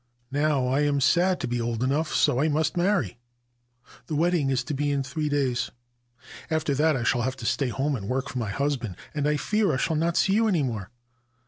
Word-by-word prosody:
Now 145 -2 +1
I 130 +2 +1
am 145 -1 +2
said 175 +6 +3
to - - -2
be 120 0 -1
old 115 0 -2
enough: 150 +5 0
so 140 -4 +2
I 155 - +3
must 155 +2 0
marry. 175 - 0 0.9
The 155 - -3
wedding 165 -2 +2
is 130 -1 +1
to 150 - -4
be 145 +1 0
in 140 -1 0
three 150 +3 -3
days. 135 -4 0 0.8
After 155 -2 0
that 155 +2 +2
I 120 - -2
shall 120 +1 +2
have 130 +2 -1
to 120 - -9
stay 135 +3 +1
at - - -5
home 140 +1 0
and 100 -5 -6
work 130 +1 -1
for 125 - -4
my 110 -4 -2
husband, 125 -5 -2 0.2
and 150 -1 0
I 150 0 +2
fear 210 +6 +1
I - - 0
shall 160 +5 0
not 165 +2 0
see 190 - +3
you 225 +2 +3
any 175 -8 +2
more. 110 -7 -3
145 Hz, 230 wpm, -26 LUFS, 125-155 Hz, 0.9 s, said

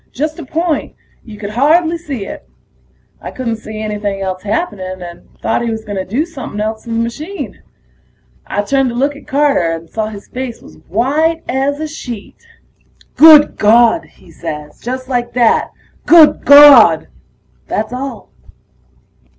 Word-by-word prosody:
Just 305 +4 -4
a 320 - -8
point; 325 -1 -2 0.3
you 215 -2 -11
could 205 -1 -6
hardly 320 +8 +2
see 285 - -6
it. 65 - -10 0.7
I - - -7
couldn't 235 -3 -4
see 215 -1 -9
anything 210 -2 -3
else 185 -1 -4
happening, 200 - -3
and 175 -1 -11
thought 225 - 0
he 235 - -2
was 220 -1 -5
gonna 200 -3 -4
do 255 - -1
somepin' 270 -10 -8
else 220 +2 -4
to - - -10
the 230 - -2
machine. 295 +12 -5 0.9
I 205 - -2
turned 270 +3 +1
to 235 - -6
look 280 +4 0
at 285 - -15
Carter, 275 - +1
and 165 0 -7
saw 215 +5 -3
his 205 -2 -10
face 250 -2 -6
was 80 - -16
white 300 - 0
as 275 +3 -1
a 310 - -3
sheet. 260 - -9 0.7
"Good 305 -1 +7
Gawd!" 235 +9 +4
he - - -21
says, 150 -1 -8
just 255 +2 -5
like 240 -2 -2
that: 240 -2 +2 0.4
"Good 330 -3 +6
Gawd!" 280 - +8 0.6
That's 220 +2 -3
all. 260 -2 -7
240 Hz, 160 wpm, -15 LUFS, 210-290 Hz, 0.9 s, Gawd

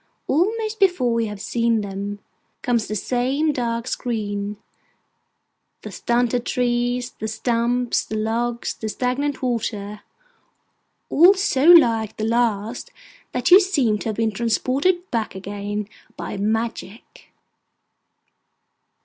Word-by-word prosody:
almost 435 +8 0
before 255 - +2
you 225 - -1
have 210 -1 -7
seen 230 +1 0
them, 200 0 -5 0.5
comes 235 -3 +1
the 215 - -3
same 260 +8 0
dark 235 -2 -2
screen: 210 -5 -3 1.3
the - - -7
stunted 240 0 0
trees, 245 0 -1
the 220 - -3
stumps, 235 +2 0
the 215 - -5
logs, 235 +2 -1
the 220 - -5
stagnant 260 +5 -2
water—all 250 - -1
so 370 -8 +1
like 230 -11 +6
the 215 - -3
last 230 -1 0 0.4
that 250 +4 -1
you 370 - +11
seem 280 - +1
to 225 - -3
have 215 - -3
been 225 0 0
transported 265 - 0
back 225 -4 -2
again 205 +1 -5 0.3
by - - -5
magic. 220 +1 -4
235 Hz, 115 wpm, -22 LUFS, 215-255 Hz, 1.3 s, you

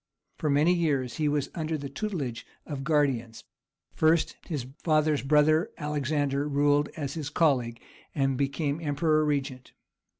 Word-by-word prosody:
For 155 - 0
many 150 +5 +4
years 140 -8 0
he 150 -1 +1
was 145 -1 -1
under 160 -1 -2
the 140 -1 -6
tutelage 140 - -4 0.2
of 145 -3 -5
guardians; 135 -7 0 0.5
first 160 +1 +2
his 145 -8 -3 0.2
father's 155 -2 +2
brother 150 +3 +3
Alexander 145 -1 -1
ruled 145 0 +2
as 140 -3 -3
his 155 -4 -4
colleague, 130 -7 +1 0.4
and 135 -2 +1
became 140 +3 -1
emperor 155 +1 +1
regent. 140 -3 -2
145 Hz, 135 wpm, -28 LUFS, 135-155 Hz, 0.5 s, many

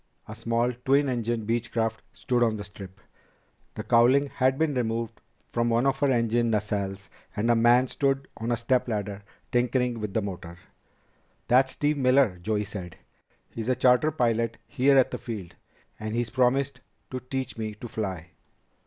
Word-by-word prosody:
A 110 - -7
small, 115 +2 0
twin 140 +2 +3
engine 120 -2 -1
Beechcraft 115 0 -1
stood 125 -1 -1
on 115 -2 +2
the 105 - -5
strip. 100 -1 -11 0.8
The - - -5
cowling 130 +4 +4
had 130 0 +1
been 160 -1 +1
removed 115 -2 -2 0.3
from 120 0 +1
one 115 +2 +2
of 135 0 +1
her 140 - +2
engine 120 -1 +2
nacelles 100 -2 -2 0.3
and 115 +2 +1
a - - +4
man 120 +3 +5
stood 135 +1 0
on 115 +2 -3
a 120 - +1
step 125 +2 +1
ladder 105 -3 -3 0.3
tinkering 125 -1 +1
with 105 -2 -5
the 110 - +2
motor. 90 -3 -7 0.9
"That's 130 +2 +4
Steve 150 0 0
Miller," 130 -7 +3
Joey 105 +2 0
said. 100 -4 -7 0.5
"He's 115 +1 -4
a 130 - +3
charter 125 +4 +4
pilot 115 -5 0
here 135 +2 +3
at 130 - +4
the - - -4
field, 105 -8 -6 0.5
and 110 +1 -4
he's 120 -1 -1
promised 130 +2 +1 0.3
to 130 - -3
teach 130 0 -4
me 110 -2 -4
to 120 - -8
fly." 95 -6 -5
120 Hz, 170 wpm, -27 LUFS, 110-130 Hz, 0.9 s, man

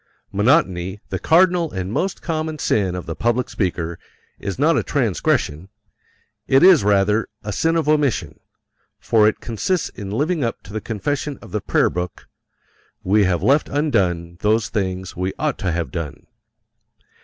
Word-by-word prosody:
Monotony, 100 - +1
the 95 - -3
cardinal 170 - +3
and 95 +1 -4
most 190 +7 -2
common 155 -2 -2
sin 95 -9 0
of 90 - -5
the 80 - -5
public 120 0 0
speaker, 85 -5 -2 0.4
is 100 - -4
not 155 +5 +3
a - - +2
transgression 95 - 0 0.8
it 135 +3 +4
is 180 - +7
rather 105 +2 +2 0.2
a 105 -1 -4
sin 165 +8 +1
of 160 -3 0
omission, 150 -5 +1 0.6
for 110 -2 +3
it 105 - 0
consists 150 - -1
in 100 -1 -8
living 150 - 0
up 115 - -3
to 100 - -12
the 110 - -3
confession 135 +6 -3
of - - -13
the 105 - -2
Prayer - - +2
Book: 90 0 -5 0.8
"We 100 +2 +3
have 90 -2 0
left 145 +3 +3
undone 90 - 0
those 110 +1 +1
things 95 -2 -3
we 90 +2 -2
ought 150 -3 -1
to 95 -3 -1
have 85 -1 -2
done." 85 -5 -6
105 Hz, 160 wpm, -21 LUFS, 95-145 Hz, 0.8 s, is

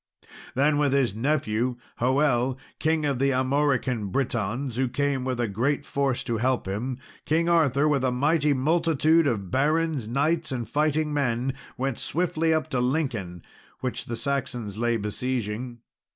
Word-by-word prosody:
Then 145 +3 +3
with 145 -2 +2
his 135 -7 +2
nephew, 125 -1 0 0.2
Hoel, 130 0 +2 0.2
King 155 0 +1
of 140 -4 0
the 135 +1 +3
Armorican 130 -4 +1
Britons, 120 +2 -2
who 130 -1 +1
came 140 +1 0
with 130 -1 -2
a 120 - +1
great 135 +8 0
force 140 -3 0
to 115 -3 -1
help 130 -2 0
him, 120 +6 -3 0.3
King 165 +2 +2
Arthur, 155 -4 +3
with 140 -3 +2
a 130 - +2
mighty 150 +4 +2
multitude 160 +2 +3
of 100 -7 -2
barons, 150 -1 +1
knights, 155 +6 0
and 120 -3 -3
fighting 150 +3 +1
men, 130 -2 0 0.2
went 135 -1 -2
swiftly 165 -1 0
up 155 -1 +1
to 130 - +1
Lincoln, 125 - -1 0.4
which 130 -2 -3
the 120 - -4
Saxons 120 -5 -3
lay 120 0 +1
besieging. 120 +2 -3
130 Hz, 150 wpm, -26 LUFS, 120-150 Hz, 0.4 s, Then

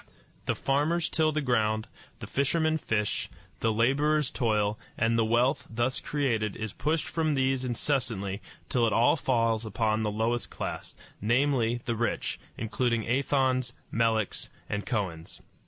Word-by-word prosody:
The - - +1
farmers 155 +5 +1
till 155 -1 +2
the 155 0 0
ground, 110 -4 +1 0.3
the - - -4
fishermen 160 +3 +1
fish, 105 -6 -1 0.3
the 115 - +2
laborers 140 +6 +2
toil, 105 -3 +1 0.2
and 115 +1 +2
the 115 - +3
wealth 120 +4 +2
thus 120 +3 0
created 115 -8 -1
is 110 -2 -5
pushed 155 +1 0
from 155 -3 0
these 135 -1 +1
incessantly 115 -6 -1 0.3
till 120 -2 +2
it 110 - 0
all 120 +6 +5
falls 115 -6 +1
upon 110 +1 0
the 110 - 0
lowest 115 +3 -1
class - - -5 0.3
namely, 120 +1 +2
the 115 - 0
rich, 120 +1 -1 0.2
including 115 +1 0
Athons, 130 -1 +1 0.2
Meleks, 115 -2 0 0.2
and 105 0 -3
Kohens. 90 -8 -3
120 Hz, 140 wpm, -28 LUFS, 110-135 Hz, 0.3 s, all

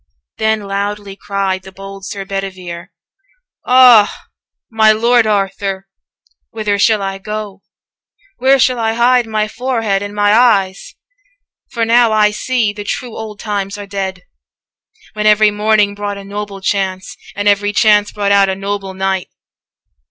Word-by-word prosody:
225 220 0 +1
Then 200 - -10
loudly 200 0 -4
cried 195 -2 -2
the 190 - -13
bold 195 0 -10
Sir 200 -2 -6
Bedivere, 185 -3 -6 0.8
'Ah! 250 -4 +6 0.5
my 220 -1 +4
Lord 230 +1 +3
Arthur, 195 -1 -2 0.6
whither 210 -2 -2
shall 215 -1 +2
I 195 0 -4
go? 210 -1 -6 0.8
Where 265 +1 +4
shall 255 -2 +2
I 225 -1 0
hide 240 +1 +2
my 215 -1 -1
forehead 225 -4 -2
and 205 0 -6
my 205 0 +3
eyes? 205 -5 +2 0.8
For 230 -2 -1
now 235 0 +4
I 210 -1 +3
see 225 -1 -1
the 205 0 -7
true 235 +3 -5
old 215 -2 -8
times 200 -1 -3
are 205 - -7
dead, 195 -2 -5 0.9
When 210 0 -1
every 210 0 +5
morning 210 -1 +2
brought 205 0 -5
a 200 - -9
noble 200 0 -7
chance, 190 -1 -2 0.3
230 - - -9
And 205 - 0
every 205 0 +2
chance 210 -1 +3
brought 200 -1 -1
out 200 -1 +4
a 190 - -1
noble 195 -1 -5
knight. 190 -1 -2
205 Hz, 150 wpm, -15 LUFS, 195-220 Hz, 0.9 s, Ah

